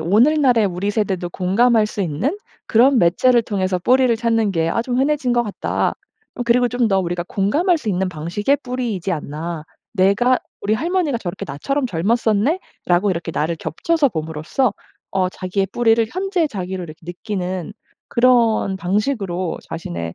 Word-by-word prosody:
오늘날의 240 Hz, -, +4 dB
우리 190 Hz, +2 st, -2 dB
세대도 190 Hz, -5 st, -1 dB
공감할 215 Hz, +5 st, +2 dB
수 210 Hz, -, -6 dB
있는 190 Hz, -, -1 dB, 0.3 s
그런 250 Hz, +3 st, +4 dB
매체를 235 Hz, +8 st, +4 dB
통해서 190 Hz, -4 st, -1 dB
뿌리를 255 Hz, +5 st, +3 dB
찾는 225 Hz, -2 st, +1 dB
게 165 Hz, -2 st, 0 dB
아 225 Hz, -, 0 dB
좀 245 Hz, +1 st, -2 dB
흔해진 275 Hz, -2 st, +1 dB
거 240 Hz, 0 st, +3 dB
같다. 210 Hz, -, -1 dB, 0.5 s
어 245 Hz, -, -2 dB
그리고 245 Hz, +1 st, +3 dB
좀 245 Hz, 0 st, +1 dB
더 195 Hz, -2 st, +2 dB
우리가 175 Hz, -1 st, -3 dB
공감할 300 Hz, -, +2 dB
수 240 Hz, -, -6 dB
있는 190 Hz, -1 st, 0 dB
방식의 180 Hz, -, -1 dB
뿌리이지 235 Hz, -8 st, -2 dB
않나. 155 Hz, +1 st, -5 dB, 0.3 s
내가 205 Hz, +6 st, +3 dB, 0.2 s
"우리 205 Hz, +2 st, 0 dB
할머니가 325 Hz, -1 st, 0 dB
저렇게 175 Hz, -6 st, -5 dB
나처럼 265 Hz, -, -2 dB
젊었었네?'라고 210 Hz, -, 0 dB
이렇게 170 Hz, -1 st, -3 dB
나를 165 Hz, +2 st, -1 dB
겹쳐서 280 Hz, -, 0 dB
봄으로써 160 Hz, -, -1 dB, 0.4 s
어 185 Hz, -1 st, +1 dB
자기의 190 Hz, +1 st, -2 dB
뿌리를 230 Hz, -1 st, +3 dB
현재의 370 Hz, -3 st, 0 dB
자기를 185 Hz, -4 st, -5 dB
이렇게 155 Hz, -1 st, -11 dB
느끼는 180 Hz, 0 st, -4 dB, 0.4 s
그런 235 Hz, -5 st, +3 dB
방식으로 190 Hz, -2 st, -1 dB
자신의 85 Hz, -, -5 dB
205 Hz, 360 characters per minute, -20 LUFS, 180-245 Hz, 0.5 s, 오늘날의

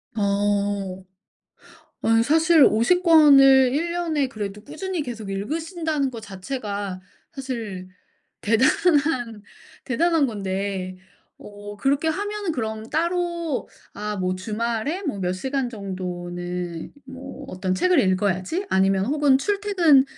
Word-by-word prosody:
아. 200 Hz, -2 st, 0 dB, 1.0 s
아니 225 Hz, 0 st, +4 dB
사실 320 Hz, +3 st, +5 dB
50 240 Hz, +12 st, +3 dB
권을 275 Hz, -6 st, +7 dB
1 340 Hz, +4 st, -1 dB
년에 320 Hz, -6 st, 0 dB
그래도 210 Hz, -3 st, -6 dB
꾸준히 325 Hz, +3 st, -4 dB
계속 230 Hz, -6 st, -7 dB
읽으신다는 310 Hz, -, -2 dB
것 235 Hz, -3 st, -8 dB
자체가 200 Hz, -2 st, -5 dB, 0.3 s
사실 230 Hz, -9 st, -6 dB, 0.5 s
대단한 255 Hz, -, +2 dB, 0.4 s
대단한 320 Hz, +4 st, +2 dB
건데 195 Hz, -3 st, -3 dB, 0.4 s
어 205 Hz, 0 st, -10 dB
그렇게 275 Hz, +8 st, +1 dB
하면은 410 Hz, +1 st, -2 dB
그럼 220 Hz, -3 st, -4 dB
따로 340 Hz, -2 st, -1 dB, 0.3 s
아 210 Hz, 0 st, -4 dB
뭐 185 Hz, -1 st, -1 dB
'주말에 230 Hz, -, -3 dB
뭐 290 Hz, -, -3 dB
몇 180 Hz, -1 st, -1 dB
시간 265 Hz, +6 st, -2 dB
정도는 180 Hz, -4 st, -5 dB
뭐 265 Hz, +1 st, -9 dB
어떤 185 Hz, 0 st, -2 dB
책을 360 Hz, -, +2 dB
읽어야지.' 190 Hz, -, 0 dB
아니면 190 Hz, 0 st, +2 dB
혹은 290 Hz, 0 st, +3 dB
'출퇴근 375 Hz, -6 st, +3 dB
235 Hz, 225 characters per minute, -23 LUFS, 200-310 Hz, 1.0 s, 권을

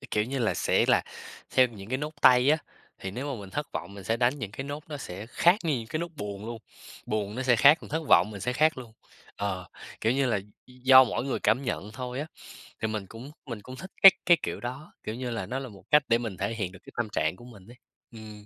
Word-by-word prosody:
cái -, -, -13 dB
kiểu 105 Hz, 0 st, +1 dB
như 135 Hz, +3 st, -3 dB
là, 115 Hz, -3 st, +1 dB
sẽ -, -, +2 dB
là -, -, +4 dB, 0.5 s
theo 130 Hz, -, +5 dB
những 100 Hz, -4 st, -11 dB
cái 130 Hz, -, 0 dB
nốt 150 Hz, +2 st, -5 dB
tay 125 Hz, +2 st, +6 dB
á, 155 Hz, -, +4 dB, 0.4 s
thì 95 Hz, -, -5 dB
nếu 135 Hz, +7 st, -4 dB
mà 115 Hz, -, -8 dB
mình 95 Hz, -, -10 dB
thất 145 Hz, +8 st, -4 dB
vọng 100 Hz, -, -6 dB
mình 100 Hz, -1 st, -10 dB
sẽ 115 Hz, +4 st, 0 dB
đánh 125 Hz, +4 st, +1 dB
những 105 Hz, -6 st, -5 dB
cái 135 Hz, -, -5 dB
nốt 145 Hz, +1 st, -6 dB
nó 150 Hz, -, -5 dB
sẽ 100 Hz, -6 st, -7 dB
khác 175 Hz, -, +4 dB
như 150 Hz, -6 st, +1 dB
những 115 Hz, -, -7 dB
cái 155 Hz, -, -2 dB
nốt 170 Hz, -, -3 dB
buồn 105 Hz, -4 st, -6 dB
luôn, 115 Hz, 0 st, -5 dB, 0.5 s
buồn 105 Hz, -1 st, -2 dB
nó 130 Hz, -, -3 dB
sẽ 125 Hz, -2 st, +3 dB
khác 145 Hz, +8 st, +7 dB
còn -, -, -12 dB
thất 160 Hz, +2 st, -1 dB
vọng 105 Hz, -, +5 dB
mình 100 Hz, -2 st, -8 dB
sẽ 125 Hz, +6 st, -1 dB
khác 155 Hz, +2 st, +2 dB
luôn. 120 Hz, -3 st, -10 dB, 0.4 s
Ờ, 95 Hz, -3 st, -3 dB, 0.3 s
kiểu 110 Hz, -, +2 dB
như 135 Hz, 0 st, +1 dB
là, 115 Hz, -4 st, +1 dB, 0.3 s
d -, -, -19 dB
do 130 Hz, 0 st, +9 dB
mỗi 120 Hz, -, -2 dB
người 135 Hz, -, -2 dB
cảm 135 Hz, -, +2 dB
nhận 105 Hz, -4 st, -3 dB
thôi 125 Hz, +3 st, -5 dB
á, 150 Hz, -, -4 dB, 0.6 s
thì 110 Hz, -, 0 dB
mình 105 Hz, -3 st, -4 dB
cũng 120 Hz, +7 st, -10 dB
mình 115 Hz, -6 st, -6 dB
cũng 130 Hz, +5 st, -10 dB
thích 190 Hz, +8 st, -10 dB
cái 195 Hz, -, +13 dB
cái 175 Hz, -1 st, +6 dB
kiểu -, -, -3 dB
đó, 130 Hz, +5 st, -7 dB
kiểu 110 Hz, -, -4 dB
như 125 Hz, 0 st, -4 dB
là, 115 Hz, -, -3 dB
nó 130 Hz, -, -3 dB
là 135 Hz, -2 st, -7 dB
một 100 Hz, -3 st, -15 dB
cách 150 Hz, -1 st, +6 dB
để 115 Hz, -, +5 dB
mình 110 Hz, -5 st, -5 dB
thể 100 Hz, +5 st, -2 dB
hiện 100 Hz, -5 st, -3 dB
được 95 Hz, -, -13 dB
cái -, -, -14 dB
tâm 120 Hz, -3 st, -1 dB
trạng 80 Hz, -5 st, 0 dB
của 120 Hz, -, -14 dB
mình 105 Hz, -6 st, -14 dB
ấy. 120 Hz, +1 st, -14 dB, 0.3 s
Ừm. 110 Hz, -2 st, -11 dB
120 Hz, 275 wpm, -27 LUFS, 105-135 Hz, 0.6 s, cái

